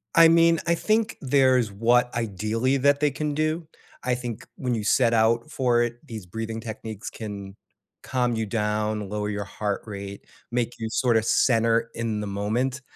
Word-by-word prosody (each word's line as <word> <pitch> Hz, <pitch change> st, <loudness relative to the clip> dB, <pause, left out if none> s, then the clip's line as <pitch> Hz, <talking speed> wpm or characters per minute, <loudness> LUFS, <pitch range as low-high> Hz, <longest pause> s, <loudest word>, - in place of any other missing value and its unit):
I 165 Hz, 0 st, +9 dB
mean, 165 Hz, 0 st, +5 dB
I 170 Hz, -, +3 dB
think 220 Hz, +4 st, 0 dB
there's 130 Hz, -4 st, +3 dB
what 120 Hz, +4 st, +2 dB
ideally 115 Hz, +4 st, 0 dB
that 140 Hz, +1 st, +3 dB
they 150 Hz, -1 st, +2 dB
can 150 Hz, +2 st, -2 dB
do. 155 Hz, +2 st, -1 dB, 0.4 s
I 125 Hz, 0 st, +1 dB
think 120 Hz, -3 st, -6 dB
when 125 Hz, -2 st, -2 dB
you 110 Hz, -, -3 dB
set 115 Hz, +3 st, +3 dB
out 115 Hz, +4 st, +2 dB
for 125 Hz, -5 st, +2 dB
it, 120 Hz, +5 st, -5 dB
these 110 Hz, -7 st, -8 dB
breathing 110 Hz, +4 st, -5 dB
techniques 110 Hz, -1 st, -7 dB
can 100 Hz, -3 st, -7 dB, 0.5 s
calm 125 Hz, -2 st, 0 dB
you 110 Hz, 0 st, -1 dB
down, 105 Hz, -1 st, -1 dB
lower 105 Hz, 0 st, -2 dB
your 105 Hz, -1 st, -3 dB
heart 100 Hz, 0 st, -3 dB
rate, 100 Hz, -2 st, -7 dB, 0.3 s
make 120 Hz, -1 st, 0 dB
you 110 Hz, -1 st, -3 dB
sort 120 Hz, 0 st, +2 dB
of 110 Hz, -, +1 dB
center 115 Hz, 0 st, +2 dB
in 115 Hz, -2 st, -2 dB
the 105 Hz, -, -4 dB
moment. 115 Hz, +7 st, -1 dB
115 Hz, 175 wpm, -25 LUFS, 105-130 Hz, 0.5 s, I